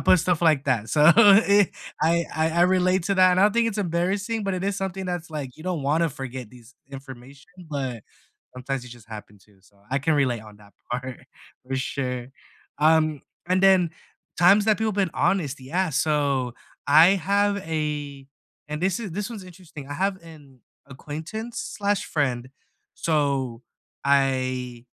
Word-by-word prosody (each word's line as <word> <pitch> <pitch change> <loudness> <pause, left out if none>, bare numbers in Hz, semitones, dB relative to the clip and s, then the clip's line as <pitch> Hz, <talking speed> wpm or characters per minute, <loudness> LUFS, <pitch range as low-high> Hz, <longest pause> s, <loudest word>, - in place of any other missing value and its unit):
put 185 - +5
stuff 175 0 0
like 155 -4 +3
that. 115 -5 0
So, 150 - +2
eh, 205 -2 +6 0.4
I 170 +1 +2
I 160 +1 +1
I - - +7
relate 185 0 +2
to 195 +1 0
that, 185 0 +6
and 180 - +2
I 200 - +6
don't 210 - +3
think 235 -1 +3
it's 215 -1 -5
embarrassing, 195 +5 -1
but 195 - -1
it 185 +1 -3
is 200 0 -1
something 190 -1 -4
that's 175 -2 -4
like, 145 -4 -5
you 155 - -12
don't 180 -5 -2
wanna 160 +4 +1
forget 130 -4 -7
these 125 0 -17 0.2
information, 135 +4 -12 0.2
but 130 -6 -4 0.5
sometimes 130 +1 -4
you, 125 - -12
just, 115 -2 -14
happen 105 -2 -10
to 100 -3 -26
so, 100 +2 -26
I 135 - +1
can 155 +3 +1
relate 130 -5 +1
on 105 -1 -14
that 100 -1 -19 0.2
part 125 0 -5 0.5
for 130 - -3
sure. 125 -2 -3 0.5
Um, 155 -1 +3 0.3
and 185 +1 +1
then 190 -3 +5 0.5
times 195 +4 +6
that 215 - +4
people 220 0 0
been 190 -4 0
honest, 165 -7 0
yeah. 175 +7 -1
So, 140 -4 0 0.3
I 155 +4 +8 0.2
have 200 0 +2
a 150 -5 -4 0.4
and 150 +1 -4
this 185 -1 +1
is 205 -7 -6
this 205 +6 -4
one's 205 -5 -8
interesting. 170 -6 -12
I 145 - -5
have 195 +2 0
an 145 -6 -15 0.3
acquaintance/friend, 155 - -3 0.4
so, 140 -6 -1 0.4
I 130 -3 0
155 Hz, 170 wpm, -24 LUFS, 130-185 Hz, 0.5 s, I